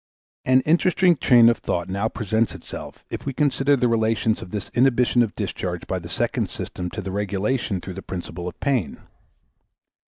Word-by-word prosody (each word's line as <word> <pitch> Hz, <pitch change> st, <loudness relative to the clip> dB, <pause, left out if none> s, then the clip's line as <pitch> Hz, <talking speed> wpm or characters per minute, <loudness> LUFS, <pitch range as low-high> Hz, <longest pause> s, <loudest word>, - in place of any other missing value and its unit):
An 130 Hz, 0 st, +5 dB
interesting 175 Hz, +4 st, +3 dB
train 120 Hz, -5 st, +6 dB
of 115 Hz, -, +3 dB
thought 85 Hz, -1 st, -2 dB
now 100 Hz, +4 st, -1 dB
presents 110 Hz, 0 st, -1 dB
itself -, -, -9 dB
if -, -, -5 dB
we 135 Hz, -, -1 dB
consider 140 Hz, 0 st, +2 dB
the 125 Hz, -2 st, +2 dB
relations 110 Hz, -1 st, +1 dB
of -, -, -8 dB
this 105 Hz, +1 st, -5 dB
inhibition 125 Hz, -1 st, +3 dB
of 115 Hz, -3 st, 0 dB
discharge -, -, -4 dB
by -, -, -2 dB
the -, -, -9 dB
second -, -, -1 dB
system 90 Hz, 0 st, -5 dB
to 105 Hz, +3 st, -6 dB
the 95 Hz, -, -4 dB
regulation 100 Hz, +2 st, -1 dB
through 95 Hz, +1 st, -7 dB
the 95 Hz, -, -7 dB
principle 90 Hz, -1 st, -6 dB
of 90 Hz, -, -8 dB
pain. 125 Hz, -, 0 dB
115 Hz, 175 wpm, -23 LUFS, 95-130 Hz, -, train